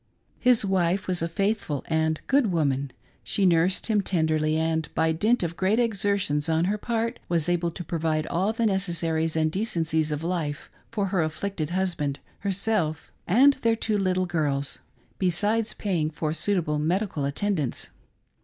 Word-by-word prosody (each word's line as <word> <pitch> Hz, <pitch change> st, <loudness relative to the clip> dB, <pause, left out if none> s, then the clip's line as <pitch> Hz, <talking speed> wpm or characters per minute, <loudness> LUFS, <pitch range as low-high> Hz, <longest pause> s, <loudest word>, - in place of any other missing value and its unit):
His 245 Hz, -4 st, +4 dB
wife 190 Hz, 0 st, +1 dB
was 180 Hz, -2 st, 0 dB
a 165 Hz, -, 0 dB
faithful 195 Hz, -5 st, -1 dB
and 160 Hz, -1 st, 0 dB
good 265 Hz, -7 st, +3 dB
woman. 140 Hz, -5 st, 0 dB, 0.3 s
She 200 Hz, -, 0 dB
nursed 175 Hz, +1 st, +3 dB
him 215 Hz, -3 st, +2 dB
tenderly, 155 Hz, -4 st, +1 dB
and 160 Hz, -1 st, 0 dB
by 160 Hz, +1 st, +2 dB
dint 215 Hz, +8 st, +2 dB
of 170 Hz, -1 st, -2 dB
great 190 Hz, +5 st, +1 dB
exertions 200 Hz, -9 st, +1 dB
on 160 Hz, +1 st, +2 dB
her 205 Hz, +3 st, 0 dB
part, 230 Hz, +2 st, -2 dB
was 170 Hz, -2 st, +1 dB
able 175 Hz, -1 st, +1 dB
to 175 Hz, +2 st, -7 dB
provide 155 Hz, -1 st, -1 dB
all 190 Hz, +7 st, 0 dB
the 225 Hz, +1 st, -1 dB
necessaries 170 Hz, -5 st, 0 dB
and 155 Hz, -1 st, +2 dB
decencies 160 Hz, -6 st, -1 dB
of 150 Hz, +1 st, -3 dB
life 165 Hz, -5 st, -3 dB, 0.2 s
for 205 Hz, -4 st, -1 dB
her 185 Hz, -2 st, +1 dB
afflicted 155 Hz, +1 st, -2 dB
husband, 170 Hz, -6 st, -1 dB, 0.2 s
herself, 195 Hz, -5 st, -1 dB, 0.2 s
and 260 Hz, +10 st, +6 dB
their 230 Hz, -1 st, +3 dB
two 220 Hz, -2 st, 0 dB
little 185 Hz, -1 st, +1 dB
girls, 145 Hz, -5 st, -1 dB, 0.4 s
besides 205 Hz, +5 st, +1 dB
paying 170 Hz, -7 st, -1 dB
for 155 Hz, 0 st, -3 dB
suitable 165 Hz, -4 st, 0 dB
medical 170 Hz, 0 st, -1 dB
attendance. 150 Hz, 0 st, -2 dB
175 Hz, 155 wpm, -26 LUFS, 160-200 Hz, 0.4 s, and